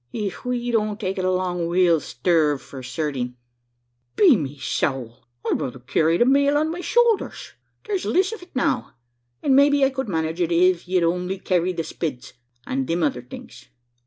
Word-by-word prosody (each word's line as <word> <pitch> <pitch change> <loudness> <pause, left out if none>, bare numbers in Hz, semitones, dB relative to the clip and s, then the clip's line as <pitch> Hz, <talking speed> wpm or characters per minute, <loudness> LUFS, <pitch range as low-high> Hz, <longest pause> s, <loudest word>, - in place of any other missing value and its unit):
Ef 205 -5 -4
we 245 -1 -1
don't 215 -2 0
take 190 -3 -3
it 185 - -1
along, 180 -2 0
we'll 170 -1 +3
sterve 150 +2 +1
for 135 -1 -10
certing." 130 -1 -3 0.8
"Be 350 -10 +6
me 145 -6 -4
sowl! 130 -3 -3 0.2
I'd - - 0
ruther 130 -1 -4
carry 155 +6 +1
the 240 - +4
male 280 +2 +4
on 310 +2 +1
my 350 +2 -5
showlders. 470 +1 +1 0.3
There's 400 -3 -2
liss 375 +3 +2
of 450 - -8
it 355 -4 -16
now; 255 - -1 0.5
an' 275 - +3
maybe 280 0 +5
I 270 - +1
could 265 -3 -4
manage 160 0 -2
it, 175 -1 0
iv 180 +1 +3
you'ld 180 -1 +2
only 180 +2 -3
carry 185 -1 0
the 170 -2 -3
spids, 135 -6 -5 0.3
an' 135 0 -2
thim 170 0 0
other 135 -5 0
things. 125 - -12
180 Hz, 180 wpm, -23 LUFS, 155-250 Hz, 0.8 s, Be